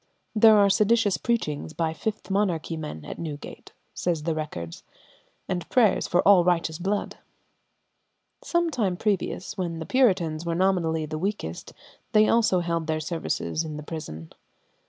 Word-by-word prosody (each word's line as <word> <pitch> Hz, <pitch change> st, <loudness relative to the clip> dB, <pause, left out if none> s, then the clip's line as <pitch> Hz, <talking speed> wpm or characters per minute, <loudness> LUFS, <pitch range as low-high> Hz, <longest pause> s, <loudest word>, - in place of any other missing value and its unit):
"There 220 Hz, 0 st, +7 dB
are 200 Hz, -1 st, +6 dB
seditious 210 Hz, 0 st, +3 dB
preachings 155 Hz, -10 st, -2 dB
by 160 Hz, -1 st, -1 dB
Fifth 215 Hz, +4 st, -4 dB
Monarchy 180 Hz, -5 st, 0 dB
men 150 Hz, -, -7 dB
at -, -, -7 dB
Newgate," 150 Hz, -3 st, -7 dB, 0.2 s
say 175 Hz, -, 0 dB
the 160 Hz, +1 st, -2 dB
records, 90 Hz, -, -5 dB, 0.7 s
"and 175 Hz, -3 st, -3 dB
prayers 225 Hz, -6 st, +3 dB
for 175 Hz, -, +2 dB
all 195 Hz, -3 st, +7 dB
righteous 170 Hz, -2 st, 0 dB
blood." 200 Hz, +3 st, -2 dB, 1.3 s
Some 345 Hz, -1 st, +1 dB
time 200 Hz, -, 0 dB
previous, 195 Hz, -1 st, -2 dB
when 170 Hz, -3 st, -2 dB
the 160 Hz, -, -5 dB
Puritans 180 Hz, -11 st, +2 dB
were 170 Hz, -1 st, -2 dB
nominally 170 Hz, -4 st, +1 dB
the 155 Hz, 0 st, -5 dB
weakest, 190 Hz, -, -4 dB, 0.4 s
they 215 Hz, 0 st, +6 dB
also 220 Hz, -6 st, +3 dB
held 170 Hz, -2 st, -2 dB
their 155 Hz, -1 st, 0 dB
services 160 Hz, 0 st, -2 dB
in 155 Hz, -2 st, -6 dB
the 150 Hz, -, -7 dB
prison. 80 Hz, -, -7 dB
175 Hz, 150 wpm, -26 LUFS, 155-205 Hz, 1.3 s, There